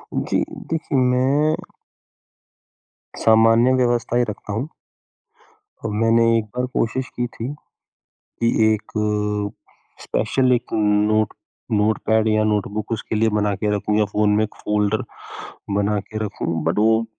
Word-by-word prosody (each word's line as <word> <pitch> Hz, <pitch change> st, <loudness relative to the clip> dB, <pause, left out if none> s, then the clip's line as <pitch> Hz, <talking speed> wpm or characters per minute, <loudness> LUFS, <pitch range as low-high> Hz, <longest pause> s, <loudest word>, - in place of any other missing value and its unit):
जी, -, -, 0 dB, 0.3 s
देखिए 160 Hz, -3 st, -2 dB
मैं 130 Hz, +4 st, +2 dB, 1.6 s
सामान्य 115 Hz, +3 st, +5 dB
व्यवस्था 120 Hz, -1 st, +1 dB
ही 120 Hz, -, +3 dB
रखता 105 Hz, 0 st, -6 dB
हूँ। 125 Hz, +7 st, -2 dB, 1.2 s
और 110 Hz, -, -1 dB
मैंने 115 Hz, +2 st, +3 dB
एक 110 Hz, -, -1 dB
बार 125 Hz, -, 0 dB
कोशिश 130 Hz, +3 st, -1 dB
की 120 Hz, -, +1 dB
थी, 115 Hz, +1 st, -7 dB, 0.7 s
कि 115 Hz, -, -4 dB, 0.3 s
एक 110 Hz, 0 st, -6 dB, 1.1 s
स्पेशल 130 Hz, +4 st, +1 dB
एक 120 Hz, -, -2 dB
नोट 105 Hz, 0 st, +2 dB, 0.4 s
नोटपैड 110 Hz, +1 st, +2 dB
या 110 Hz, 0 st, +2 dB
नोटबुक 105 Hz, +1 st, -1 dB
उसके 115 Hz, 0 st, -3 dB
लिए 110 Hz, +1 st, +3 dB
बना 105 Hz, -1 st, +1 dB
के 105 Hz, -, -2 dB
रखूँ 105 Hz, +1 st, 0 dB
या 105 Hz, -, +3 dB
फ़ोन 105 Hz, +1 st, +1 dB
में 110 Hz, -, +3 dB
एक 110 Hz, -, -5 dB
फोल्डर 105 Hz, 0 st, 0 dB, 0.7 s
बना 105 Hz, 0 st, +1 dB
के 110 Hz, +2 st, -8 dB
रखूँ, 85 Hz, -5 st, -3 dB
बट 85 Hz, +5 st, +1 dB
वो 110 Hz, +1 st, +3 dB
110 Hz, 135 wpm, -21 LUFS, 105-120 Hz, 1.6 s, सामान्य